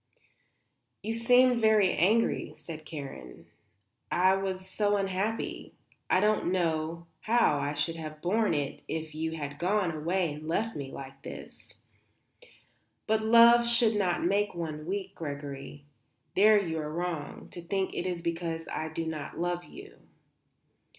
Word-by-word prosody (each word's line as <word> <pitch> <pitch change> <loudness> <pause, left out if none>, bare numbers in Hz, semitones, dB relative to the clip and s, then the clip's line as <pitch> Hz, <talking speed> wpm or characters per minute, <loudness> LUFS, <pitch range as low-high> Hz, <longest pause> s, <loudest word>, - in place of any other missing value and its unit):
"You 220 +2 -2
seemed 245 +2 +4
very 215 -4 +4
angry," 215 +7 +2
said 155 -2 -9
Karen. 135 - -8 0.7
"I 185 +1 +4
was 190 -1 -3
so 205 +2 +1
unhappy. 195 +3 -2 0.3
I 185 - +4
don't 210 -3 +2
know 165 -2 -1
how 220 -10 +3
I 145 +1 -2
should 155 +3 -1
have 155 -1 -7
borne 205 +2 +1
it 145 -2 -3
if 160 -1 -4
you 160 +1 -3
had 145 -3 -6
gone 185 0 +1
away 165 +1 -1
and 150 +1 -9
left 220 +7 -1
me 135 -2 -5
like 135 0 -9
this. - - -10 1.3
But 220 0 +2
love 235 +1 +7
should 235 -2 +4
not 185 -4 +1
make 200 +2 +1
one 155 -2 -5
weak, 195 +1 -3
Gregory. 145 -1 -7 0.5
There 210 +2 +6
you 165 -5 -2
are 150 -1 -4
wrong, 170 -2 -4
to 175 - -8
think 190 +2 -2
it 180 - -2
is 175 -2 -3
because 165 -1 -3
I 160 - -3
do 165 +1 -4
not 155 -3 -5
love 175 0 -2
you." 405 +2 -13
175 Hz, 145 wpm, -29 LUFS, 155-205 Hz, 1.3 s, love